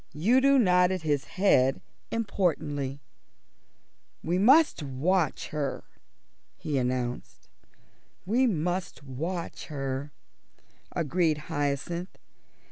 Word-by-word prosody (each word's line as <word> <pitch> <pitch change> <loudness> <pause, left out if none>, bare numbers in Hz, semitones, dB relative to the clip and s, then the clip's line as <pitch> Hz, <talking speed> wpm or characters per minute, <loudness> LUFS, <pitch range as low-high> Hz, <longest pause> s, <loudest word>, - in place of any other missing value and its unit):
Udo 260 - +4
nodded 180 -5 +3
his 145 -3 0
head 135 -9 +2 0.3
importantly. 150 -11 -1 1.2
"We 175 +3 0
must 275 - +5
watch 150 +4 0
her," 150 -2 -3 0.7
he 145 -3 -2
announced. 125 -1 -3 0.8
"We 245 +7 +2
must 175 -4 -2
watch 165 +7 -5
her," 135 -1 -4 0.8
agreed 165 -1 +1
Hyacinth. 145 +5 -2
165 Hz, 80 wpm, -28 LUFS, 140-185 Hz, 1.2 s, must